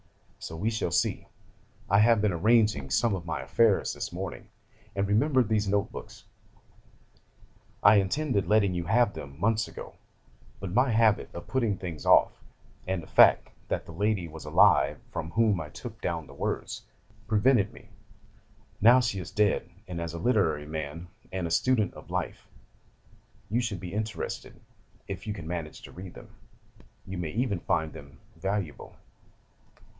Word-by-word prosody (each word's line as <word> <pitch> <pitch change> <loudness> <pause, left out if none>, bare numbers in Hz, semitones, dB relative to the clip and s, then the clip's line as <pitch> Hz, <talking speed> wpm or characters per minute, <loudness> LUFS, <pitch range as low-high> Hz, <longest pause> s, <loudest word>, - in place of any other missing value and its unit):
So 80 - -7
we 105 +8 -1
shall 110 -5 -1
see. 90 - 0 0.6
'I 100 - +4
have 115 0 +5
been 105 - +3
arranging 105 - +2
some 115 - +2
of 85 -3 -5
my 75 -4 -2
affairs 100 - +2
this - - -5
morning, - - -6 0.5
and 100 0 0
remembered 130 +4 +3
these 105 -2 +1
notebooks. 100 +1 -3 1.6
I 105 +2 +8
intended 100 +2 0
letting 105 -3 +3
you 85 -1 -2
have 110 +3 +3
them 70 +1 -9
months 110 +2 +1
ago, - - -9 0.7
but 90 -1 -5
my 125 +4 +3
habit 110 -2 +3
of 85 - -7
putting 115 -7 0
things 85 -5 -6
off, - - +4 0.4
and 95 -2 -2
the - - -12
fact - - +6 0.2
that - - -2
the - - -10
lady 100 +1 0
was 80 0 -10
alive 75 - +4
from 80 - -4
whom 105 -2 +2
I 75 - -7
took - - -9
down - - -2
the - - -14
words, - - -3 0.5
prevented 110 0 +3
me. - - -16 0.9
Now 120 +4 +8
she 115 -5 -1
is 90 - -6
dead, 105 -1 +1 0.2
and 85 -2 -5
as 85 0 -4
a - - -5
literary 85 -9 +1
man, 80 +2 -6 0.2
and 95 -2 -2
a 85 - -3
student 110 +1 +2
of - - -13
life, - - -4 1.0
you 120 +3 +2
should 115 -6 -3
be 90 0 -7
interested, 110 0 -4 0.5
if 95 +2 -6
you 105 - -1
can 85 -6 -8
manage 80 -3 -5
to - - -11
read 90 -1 -10
them. - - -12 0.8
You 95 -1 -6
may 85 -3 -3
even 110 -2 -1
find 80 -1 -1
them 70 0 -12 0.2
valuable. 95 -2 -4
100 Hz, 160 wpm, -28 LUFS, 85-110 Hz, 1.6 s, I